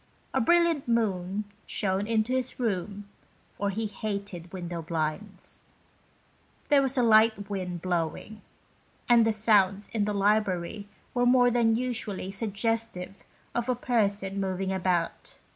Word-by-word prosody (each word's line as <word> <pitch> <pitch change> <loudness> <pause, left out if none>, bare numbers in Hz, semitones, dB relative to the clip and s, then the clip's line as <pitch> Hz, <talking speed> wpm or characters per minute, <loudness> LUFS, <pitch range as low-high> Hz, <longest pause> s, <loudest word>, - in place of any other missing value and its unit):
A 265 - +2
brilliant 340 +1 +3
moon 205 -4 0 0.2
shone 195 +1 -1
into 225 +2 +1
his 260 0 -2
room, 205 -3 -2 0.5
for 200 - -1
he 220 +3 -2
hated 200 -4 -5
window 175 -2 -5
blinds. 165 +5 -4 1.1
There 290 -2 +6
was 270 0 -1
a 250 - +4
light 220 -2 +4
wind 180 -3 -4
blowing, 180 +4 -2 0.7
and 235 -2 +6
the - - +4
sounds 205 -2 +2
in 215 -3 0
the 210 0 -1
library 200 -1 0 0.3
were 245 0 +2
more 245 0 +5
than 230 -2 +3
usually 220 -6 -3
suggestive 215 -2 -2 0.4
of 240 +1 -2
a 250 - +2
person 200 -5 0
moving 190 0 -1
about. 180 -3 -1
205 Hz, 130 wpm, -28 LUFS, 190-230 Hz, 1.1 s, There